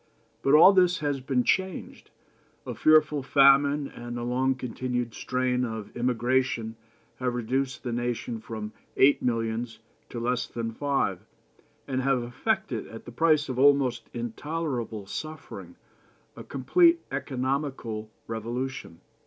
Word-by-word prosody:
But 135 +2 +4
all 175 +6 +9
this 180 -1 +4
has 145 -2 -1
been 130 -1 0
changed. 190 +4 -2 0.6
A - - -4
fearful 155 -2 +4
famine 140 +1 +4
and 120 -1 -7
the 120 - -4
long 130 +2 +1
continued 125 -1 -3
strain 125 0 -1
of 110 -3 -5
emigration 120 -1 0 0.4
have 125 -1 -2
reduced 130 +2 -2
the 120 - -3
nation 120 -1 -3
from 110 -1 -7 0.2
eight 140 +2 +5
millions 115 -1 -2 0.3
to 120 - -5
less 125 +1 -1
than 115 -1 -4
five, 140 +4 -1 0.7
and 130 -1 -1
have 135 -2 +1
effected, 120 0 -2
at 115 - -11
the 120 - -9
price 155 +3 +3
of 130 -2 -3
almost 135 -4 +3
intolerable 120 -2 -4
suffering, 155 +9 -8 0.6
a - - -9
complete 340 -1 +3
economical 130 -5 -3 0.2
revolution. 115 -4 -5
125 Hz, 130 wpm, -27 LUFS, 120-140 Hz, 0.7 s, all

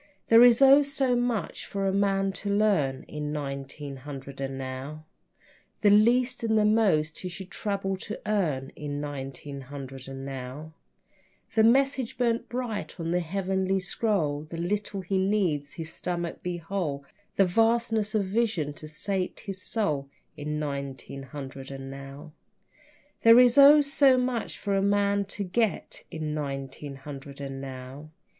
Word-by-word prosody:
There 230 +1 +8
is 245 +2 +7
oh, 275 +2 +8
so 275 -3 +1
much 240 -6 -1
for 195 -1 -2
a 190 - +1
man 195 -1 +2
to 200 +1 -5
learn 200 -11 +2
In 150 -1 -5
nineteen 140 -1 -5
hundred 135 0 -8
and 135 0 -3
now: 135 +4 -6 0.8
The 205 - +5
least 240 +4 +4
and 220 -1 +2
the 210 - +4
most 190 -8 +2
he 185 - -5
should 190 +2 -8
trouble 195 -2 -2
to 210 +3 -6
earn 155 -11 0
In 145 -1 -4
nineteen 140 -1 -6
hundred 135 -1 -8
and 135 0 -7
now, 135 +4 -7 0.8
The 220 - +4
message 260 +1 +3
burned 235 -1 0
bright 240 -6 -4
on 165 0 -2
the 175 - +2
heavenly 190 +2 0
scroll, 180 -6 0
The 165 - -6
little 200 +3 -2
he 190 +1 -1
needs 185 -7 +1
that - - -16
his 165 -1 -6
stomach 175 -1 -3
be 180 -1 -3
whole, 165 -5 -3 0.3
The 195 - +5
vastness 225 +2 +2
of 210 - +3
vision 190 -8 0
to 155 - -9
sate 185 +4 -3
his 195 -3 -7
soul, 150 -13 -1 0.3
In 150 0 -3
nineteen 140 -2 -5
hundred 135 -1 -8
and 135 -1 -7
now. 140 +3 -9 0.9
There 230 +1 +8
is 245 -1 +6
oh, 285 +1 +9
so 280 -2 +4
much 250 -2 -1
for 200 - -2
a 195 - +2
man 200 0 +2
to 200 +1 -5
get 200 +3 -1
In 155 -1 -4
nineteen 140 -1 -5
hundred 140 0 -9
and 135 -1 -5
now. 135 +2 -8
180 Hz, 160 wpm, -27 LUFS, 140-215 Hz, 0.9 s, oh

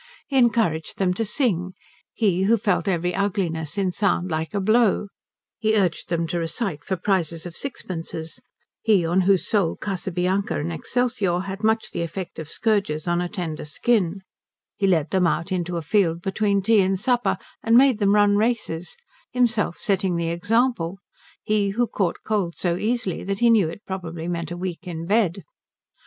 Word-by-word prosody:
He 275 - -5
encouraged 225 -11 +2
them 185 -2 +2
to 225 - -1
sing, 200 - 0 0.4
he 190 -4 +1
who 230 +3 +4
felt 205 -2 0
every 180 -1 0
ugliness 175 -6 -1
in 190 -2 +1
sound 185 -2 0
like 160 +3 -2
a - - +2
blow; 215 0 +3 0.5
he 220 0 +2
urged 185 -5 0
them 170 -1 0
to 175 - -1
recite 165 - -2
for 190 - -1
prizes 170 -3 -1
of 175 -1 -7
sixpences, 165 -6 -6 0.4
he 205 -6 +3
on 175 +3 +2
whose 190 0 +2
soul 195 -7 +1
Casabianca 190 0 -1
and 165 +4 -3
Excelsior 210 -3 0
had 195 +2 -6
much 220 +1 +1
the - - -3
effect 170 +2 -5
of 160 -1 -7
scourges 200 -9 0
on 175 0 +1
a 175 - -2
tender 175 -6 -4
skin; 190 +3 0 0.5
he 195 - +1
led 165 -5 +2
them 185 -2 +3
out 170 +2 -1
into 175 -1 -1
a 165 - -4
field 170 -2 +1
between 200 0 +1
tea 220 0 +5
and 190 0 +1
supper 245 +2 +1 0.2
and 230 +1 +4
made 260 -4 +5
them 200 -1 +3
run 205 -1 +4
races, 210 -7 -1 0.3
himself 235 -7 +1
setting 190 -3 0
the 170 -1 -1
example, 205 0 +1 0.5
he 210 -2 +1
who 240 - +4
caught 190 -6 -2
cold 200 -6 -1
so 175 -2 0
easily 220 -1 -1
that 195 0 -2
he 235 +2 +4
knew 205 -8 +4
it 170 +6 -10
probably 175 -3 -5
meant 170 -2 -3
a 175 - -5
week 180 0 -5
in 165 -2 -5
bed. 200 -2 +1
190 Hz, 175 wpm, -23 LUFS, 170-215 Hz, 0.5 s, tea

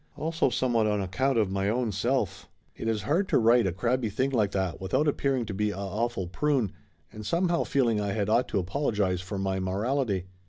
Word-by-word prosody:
Also 160 -3 0
somewhat 120 -3 +1
on 105 -1 +1
account 120 +8 0
of 105 -4 +2
my 100 +1 0
own 120 0 0
self. 120 +7 -1 0.3
It - - -5
is 110 -3 0
hard 170 - +1
to - - +4
write 115 -1 +4
a - - 0
crabby 115 +6 0
thing 130 +7 0
like 110 -6 +2
that 95 -3 -2
without 95 +11 +1
appearing 135 -4 0
to 105 - -5
be 105 +2 0
a 100 - -5
awful 100 +1 -2
prune, 125 - 0 0.4
and 110 - -8
somehow 170 - +1
feeling 120 -6 +1
I 100 -1 -1
had 100 -2 -1
ought 120 +3 +2
to - - -2
apologize 95 -2 0
for 95 +2 -5
my 95 0 -1
morality. 100 +1 -1
110 Hz, 205 wpm, -28 LUFS, 95-130 Hz, 0.4 s, to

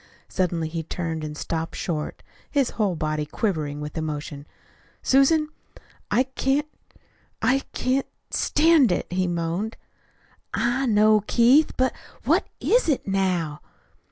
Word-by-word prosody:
Suddenly 170 -3 -1
he 165 +1 -3
turned 160 -1 -4
and 150 0 -5
stopped 165 +1 -3
short, 155 -4 -4 0.3
his 275 -4 +1
whole 205 -5 0
body 155 -1 -1
quivering 150 -4 -2
with 150 0 -6
emotion. 150 -2 -5 0.6
"Susan, 305 +4 +4 0.6
I 255 - +3
can't! 270 +2 0 0.7
I 270 +1 +3
can't 260 +2 0 0.2
stand 305 - +4
it," - - 0
he 185 0 +1
moaned. 175 +5 -2 0.8
"I 240 +3 +1
know, 215 -1 +5
Keith. 255 +6 +5
But, 260 0 +2 0.3
what - - +2
is 485 -7 +2
it 275 - 0
now?" 185 -6 0
190 Hz, 125 wpm, -24 LUFS, 160-260 Hz, 0.8 s, know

